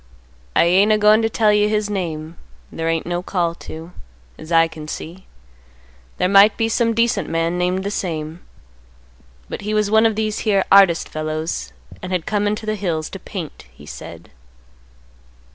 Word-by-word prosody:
I - - +5
ain't 190 +5 +4
a 215 - +4
goin' 210 +1 +5
to 225 - +1
tell 215 -1 +2
you 210 0 +3
his 210 -1 0
name; 165 -5 -4 0.4
there 165 0 -3
ain't 165 -1 -1
no 175 0 -2
call 175 -2 -1
to, 165 0 -10 0.4
as 155 +2 -12
I 165 0 +5
can 155 -1 -10
see. 170 +4 -8 0.9
There 180 - +1
might 200 +2 +6
be 225 - +1
some 230 0 +1
decent 235 +1 +1
man 165 +2 -1
named 180 +1 0
the 200 - -3
same. 160 -4 -4 1.1
But - - -6
he 210 +1 -2
was 210 -1 +1
one 220 +1 +5
of 220 - -2
these 215 -1 -2
here 200 -3 +1
artist 195 -4 +5
fellows 155 +1 -4 0.3
and 185 - -6
had 180 -3 -1
come 205 -1 0
into 210 +2 -2
the 215 - -1
hills 170 -7 -3
to 195 - -7
paint, 180 - -8
he 65 +4 -16
said." - - -10
185 Hz, 180 wpm, -20 LUFS, 165-210 Hz, 1.1 s, might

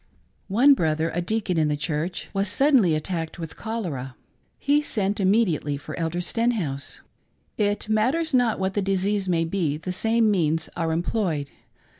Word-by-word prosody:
One 245 +9 +6
brother 160 - 0
— - - -11
a 175 - 0
deacon 195 -2 -1
in 155 - +3
the 150 0 0
church 160 +4 -3
— - - -33
was 195 0 0
suddenly 235 - +3
at 155 - -2
tacked 165 -3 -4
with 165 -2 -7
cholera. 160 - -4 0.4
He 290 +2 +2
sent 205 -8 -1
immediately 185 -8 +2
for 140 - -8
Elder 165 +1 -1
Sten 230 +6 0
house. 140 -7 -4 0.5
It 205 -1 0
rnatters 260 +10 +1
not 245 -4 +3
what 190 0 -1
the 205 - 0
disease 195 0 0
may 165 -2 +2
be, 165 -4 -1
the 170 +4 -5
same 225 +3 +2
means 160 -4 +1
are 165 -1 -1
employed. 165 -4 -1
190 Hz, 175 wpm, -24 LUFS, 160-220 Hz, 0.5 s, One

